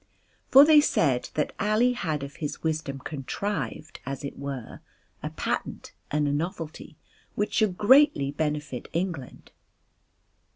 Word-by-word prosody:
For 275 Hz, +2 st, +9 dB
they 305 Hz, -1 st, +7 dB
said 135 Hz, -, +1 dB
that 150 Hz, -, -1 dB
Ali 220 Hz, +4 st, +3 dB
had 155 Hz, -, -2 dB
of 140 Hz, 0 st, -8 dB
his 150 Hz, -2 st, -5 dB
wisdom 155 Hz, -3 st, -2 dB
contrived 155 Hz, +4 st, -4 dB
as 135 Hz, +1 st, -5 dB
it 140 Hz, -, -5 dB
were 140 Hz, -4 st, -6 dB, 0.4 s
a -, -, -3 dB
patent -, -, -4 dB, 0.2 s
and 150 Hz, 0 st, +1 dB
a -, -, +1 dB
novelty 160 Hz, -1 st, -5 dB, 0.4 s
which 210 Hz, -, -1 dB
should 210 Hz, -5 st, +1 dB
greatly 240 Hz, -, +5 dB
benefit 150 Hz, -3 st, -3 dB
England. 165 Hz, -7 st, -4 dB
155 Hz, 130 wpm, -26 LUFS, 140-205 Hz, 0.4 s, For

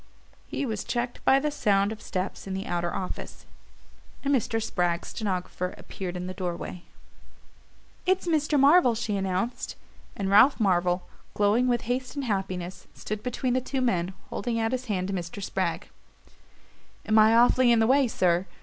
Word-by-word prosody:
He -, -, -3 dB
was 220 Hz, -5 st, -3 dB
checked 240 Hz, 0 st, -3 dB
by 270 Hz, -, +6 dB
the 300 Hz, +2 st, -1 dB
sound 200 Hz, -7 st, +2 dB
of 220 Hz, -, -7 dB
steps 185 Hz, +1 st, -4 dB
in 190 Hz, -, -3 dB
the 190 Hz, -, -4 dB
outer 175 Hz, 0 st, -1 dB
office, 185 Hz, -, -6 dB, 0.8 s
and 280 Hz, 0 st, +1 dB
Mr. 225 Hz, -3 st, +1 dB
Spragg's 175 Hz, -6 st, -1 dB
stenographer 180 Hz, -3 st, -3 dB
appeared 180 Hz, -2 st, -6 dB
in 180 Hz, -, -4 dB
the 185 Hz, -, -5 dB
doorway. 180 Hz, -1 st, -5 dB, 1.3 s
"It's 375 Hz, 0 st, +2 dB
Mr. 300 Hz, -3 st, +2 dB
Marvell," 275 Hz, -3 st, +6 dB
she 220 Hz, -2 st, -2 dB
announced; 195 Hz, +5 st, -2 dB, 0.4 s
and 195 Hz, -, -2 dB
Ralph 250 Hz, +8 st, +6 dB
Marvell, 180 Hz, -3 st, +1 dB, 0.3 s
glowing 210 Hz, +5 st, +3 dB
with 240 Hz, -2 st, +1 dB
haste 250 Hz, +3 st, -3 dB
and 280 Hz, -2 st, -3 dB
happiness, 190 Hz, -4 st, -3 dB
stood 215 Hz, 0 st, -5 dB
between 250 Hz, +1 st, -1 dB
the 255 Hz, -, +1 dB
two 265 Hz, +1 st, -3 dB
men, 190 Hz, -7 st, 0 dB, 0.2 s
holding 230 Hz, +2 st, -2 dB
out 225 Hz, 0 st, 0 dB
his 255 Hz, 0 st, -2 dB
hand 190 Hz, -5 st, -2 dB
to -, -, -2 dB
Mr. 175 Hz, +1 st, -5 dB
Spragg. 200 Hz, -, -2 dB, 1.2 s
"Am 220 Hz, 0 st, +4 dB
I 220 Hz, +1 st, +6 dB
awfully 245 Hz, +1 st, +5 dB
in 235 Hz, -, +5 dB
the 225 Hz, -, +4 dB
way, 265 Hz, +2 st, +4 dB
sir? 180 Hz, -4 st, +1 dB
215 Hz, 170 wpm, -27 LUFS, 185-250 Hz, 1.3 s, by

